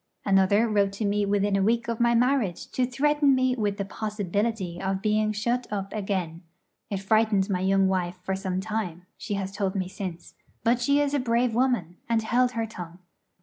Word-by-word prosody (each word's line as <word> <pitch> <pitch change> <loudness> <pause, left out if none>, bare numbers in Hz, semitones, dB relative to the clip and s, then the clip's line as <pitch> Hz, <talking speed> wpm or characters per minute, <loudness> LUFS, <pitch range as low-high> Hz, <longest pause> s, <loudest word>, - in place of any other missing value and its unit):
Another 200 +3 +4
wrote 200 -2 +1
to 210 +2 -3
me 205 0 +1
within 200 0 +1
a 195 - +2
week 230 +4 +1
of 230 -1 -2
my 235 0 +3
marriage 240 -7 +1
to 250 -1 0
threaten 290 +2 +3
me 255 0 +2
with 205 -4 -1
the 200 - -2
possibility 205 -2 -2
of 190 0 -1
being 215 +1 +1
shut 235 +4 -1
up 195 -1 -3
again. 190 -6 -3 0.5
It 200 - -2
frightened 210 -1 +2
my 180 - 0
young 195 +1 +3
wife 180 -1 -1
for 190 +1 -1
some 190 -1 -2
time, 190 -5 -4
she 210 -1 -4
has 195 -1 -3
told 195 -1 -2
me 185 -2 -1
since; 185 -2 -7 0.3
but 240 +1 +2
she 280 +3 +3
is 290 -1 +1
a 290 - +2
brave 240 -1 +1
woman, 230 -9 0
and 225 -1 +2
held 245 +3 +2
her 230 -1 -1
tongue. 175 -5 -9
210 Hz, 195 wpm, -26 LUFS, 190-235 Hz, 0.5 s, Another